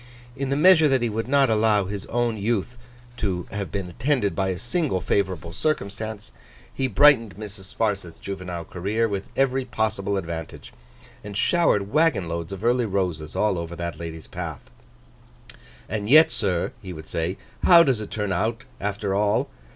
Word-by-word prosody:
In 135 -1 -3
the 140 - +1
measure 160 0 +6
that 135 -3 +2
he 120 - +1
would 110 +2 -3
not 135 -2 +3
allow 105 -2 +3
his 100 +1 -5
own 120 -1 0
youth 110 +2 -1 0.4
to 90 -4 -2
have 100 -1 -4
been 95 -2 -3
attended 120 - 0
by 95 -1 0
a 95 -1 -1
single 125 - -1
favourable 95 -3 -1
circumstance, 110 -6 -3 0.4
he 135 - 0
brightened 120 -3 +5
Mrs. 105 -2 -6
Sparsit's 100 -6 -1
juvenile 90 -3 -6
career 105 +7 -1
with 100 -2 -4
every 135 -1 +2
possible 105 -4 -1
advantage, 85 -3 -6 0.5
and 105 -1 -6
showered 105 - +2
waggon 155 - +2
loads 85 +1 -4
of 95 +1 -7
early 120 -1 +2
roses 90 -6 -2
all 105 -4 +1
over 85 0 -5
that 85 -2 -5
lady's 80 -1 -7
path. - - -6 1.3
'And 105 0 -3
yet, 155 +4 +8
sir,' 95 -6 -1
he 95 -3 -7
would 80 -1 -9
say, 85 +4 -2 0.3
'how 170 -2 +8
does 130 -8 +1
it 105 - -6
turn 105 -2 -2
out 110 +5 -1 0.2
after 100 0 -2
all? 105 +1 +1
105 Hz, 165 wpm, -24 LUFS, 95-120 Hz, 1.3 s, yet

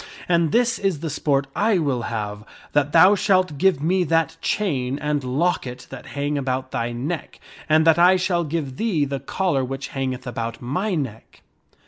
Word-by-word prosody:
And 170 -3 +2
this 235 +1 +2
is 190 -7 -1
the 165 -2 -3
sport 140 -1 0
I 215 -1 +2
will 140 -7 0
have, 105 -3 -4 0.3
that 145 -1 +2
thou 180 +5 +7
shalt 185 -7 +1
give 185 -6 +2
me 180 +3 +2
that 165 0 +1
chain 140 -10 -1
and 150 -1 -1
locket 130 -2 -1
that 130 - -9
hang 145 +1 -1
about 130 -1 -3
thy 115 +1 -2
neck, 145 +8 -5 0.3
and 155 +1 +4
that 165 0 +5
I 180 +2 +6
shall 180 -2 0
give 150 -4 -4
thee 185 -11 +1
the 140 -1 -3
collar 175 -7 -1
which 135 +1 -5
hangeth 130 -1 -3
about 115 -2 -4
my 180 - -2
neck." 130 -8 -6
150 Hz, 175 wpm, -22 LUFS, 130-175 Hz, 0.3 s, thou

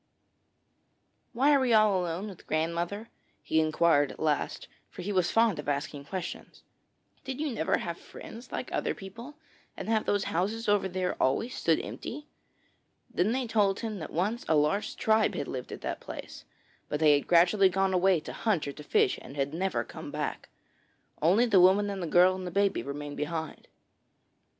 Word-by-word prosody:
'Why 275 +5 +4
are 280 - +5
we 255 -3 +2
all 210 -4 +4
alone 175 +4 -3
with 195 -4 -11
grandmother?' 170 +7 -2 0.3
he 160 - +1
inquired 155 -2 +3
at - - -13
last, 155 -2 -1 0.2
for 180 - -9
he 205 - -3
was 185 -3 +2
fond 225 -7 +3
of 145 - -4
asking 145 0 -3
questions. 185 +2 -6 0.6
'Did 265 0 -5
you 305 -2 -1
never 190 -9 +1
have 170 -1 -5
friends 235 +3 -11
like - - -4
other - - -1
people, 230 +9 -10 0.4
and - - -6
have 220 -1 +1
those 205 -1 +2
houses 210 +7 -2
over 205 -2 +3
there 185 0 -2
always 180 - +1
stood 165 -1 +1
empty?' 295 +4 -7 0.9
Then 190 +5 +2
they 260 +1 0
told 205 -4 +1
him 220 -3 -4
that 155 - -6
once 205 +8 -1
a 160 - +3
large 150 +7 +1
tribe 220 0 +2
had 140 - -3
lived 125 -1 -6
at - - -7
that - - -4
place, - - -9 0.4
but 150 - -2
they 155 -2 +6
had 145 - +1
gradually 180 +3 +5
gone 190 +1 +1
away 185 -1 +4
to - - -8
hunt 200 -10 0
or - - -3
to 150 - -11
fish 130 - +2
and 135 - -11
had 140 +1 -1
never 190 +3 -1
come - - -9
back. - - -4 0.7
Only 190 +10 +4
the 205 -6 +5
woman 200 +3 +5
and 195 -1 -5
the 170 - -3
girl 180 +3 +5
and 185 -1 -5
the - - -2
baby 200 +2 +1
remained 145 +1 -6
behind. 160 +1 -4
185 Hz, 185 wpm, -29 LUFS, 160-215 Hz, 0.9 s, they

